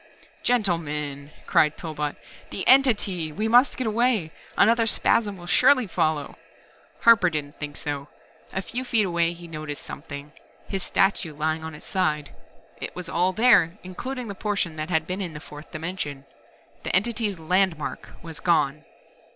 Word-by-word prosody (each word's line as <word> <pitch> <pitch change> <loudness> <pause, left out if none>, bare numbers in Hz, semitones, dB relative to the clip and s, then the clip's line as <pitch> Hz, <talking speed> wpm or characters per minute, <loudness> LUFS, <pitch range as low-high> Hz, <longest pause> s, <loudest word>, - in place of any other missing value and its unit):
_" - - -30
"Gentlemen," 150 - -1 0.2
cried 150 -1 +3
Pillbot. 150 -3 -4 0.3
"The 190 - -3
entity 210 - +4
we 215 +9 -2
must 245 +4 +5
get 255 - -1
away. 220 -6 +1 0.3
Another 230 +2 +4
spasm 210 -2 +2
will 175 - -11
surely 255 +6 +5
follow 155 -5 -1 0.3
" - - -30
Harper 225 -6 +6
didn't 150 -3 -5
think 145 -1 -5
so. 145 -1 -4 0.4
A 190 - -3
few 250 +6 -4
feet 230 -4 +2
away 170 -2 +1
he 175 0 -12
had 165 - -12
noticed 155 -2 -6
something 145 +1 -8 0.4
his 195 -1 -3
statue 185 -5 +1
lying 155 +1 -1
on 160 -1 -6
its - - -13
side. 155 -6 -1 0.4
It - - -6
was 180 -1 -6
all 180 +2 +2
there, 215 -6 +4
including 250 +7 -5
the 200 - -5
portion 200 -5 -2
that 155 +2 -4
had 160 -3 +1
been 185 +3 -3
in 175 -4 -4
the 150 - -7
fourth 150 0 -12
dimension. 155 -4 -5 0.6
The - - -1
Entity's 210 0 +1
"landmark" 165 -2 0
was 165 -2 -8
gone. 155 -3 +1
175 Hz, 165 wpm, -25 LUFS, 155-210 Hz, 0.6 s, Harper